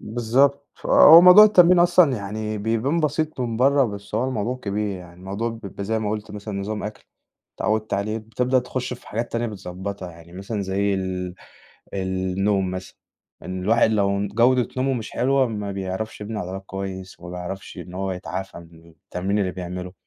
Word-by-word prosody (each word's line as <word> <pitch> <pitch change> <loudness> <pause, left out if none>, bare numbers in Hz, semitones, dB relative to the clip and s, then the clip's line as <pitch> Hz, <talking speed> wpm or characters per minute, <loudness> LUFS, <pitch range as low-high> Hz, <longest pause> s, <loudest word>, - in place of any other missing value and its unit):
بالضبط، 130 +6 +1 0.2
آه، - - +4
هو 170 - +12
موضوع 180 +4 +10
التمرين 180 -4 +6
أصلًا 175 -6 +5
يعني 105 +1 -4
بيبان 115 +9 0
بسيط 155 -1 -1
من 115 -3 -2
برّا، 135 +2 +4
بس 100 -1 -6
هو 115 - +1
الموضوع 125 +1 -2
كبير 105 -3 -3
يعني، 85 -1 -13
الموضوع 100 +6 -4
بيبقى 100 -3 -7
زي 110 +2 0
ما 105 -1 -2
قُلت 105 -1 -4
مثلًا 105 -1 -5
نظام 105 +1 -4
أكْل، 105 0 -7 0.5
اتعودت 110 0 -1
عليه، 105 +3 -2
بتبدأ 125 +4 0
تخش 125 0 -3
في 120 - -16
حاجات 115 +3 -3
تانية 120 0 -1
بتضبّطها 95 -2 -6
يعني، 85 +1 -15
مثلًا 100 +3 -4
زي 100 +1 0
ال 90 -1 -3 0.6
النوم 95 0 0
مثلًا، 95 0 -7 0.5
إن 95 0 -5
الواحد 115 +2 +3
لو 100 -2 +1
ن 100 - -2
جودة 120 +4 +3
نومه 135 +1 +1
مش 115 -3 -5
حلوة 135 +1 +2
ما 105 -3 -4
بيعرَفش 95 +3 -5
يبني 105 +1 -5
عضلات 95 0 -6
كويس، 95 -1 -7
ما 90 - -9
بيعرفش 90 +2 -7
إن 90 +1 -9
هو 95 0 -2
يتعافى 95 0 -6
من 85 -1 -16
التمرين 90 +5 -3
اللي 95 -3 0
بيعمله، 90 0 -6
105 Hz, 180 wpm, -23 LUFS, 95-120 Hz, 0.6 s, هو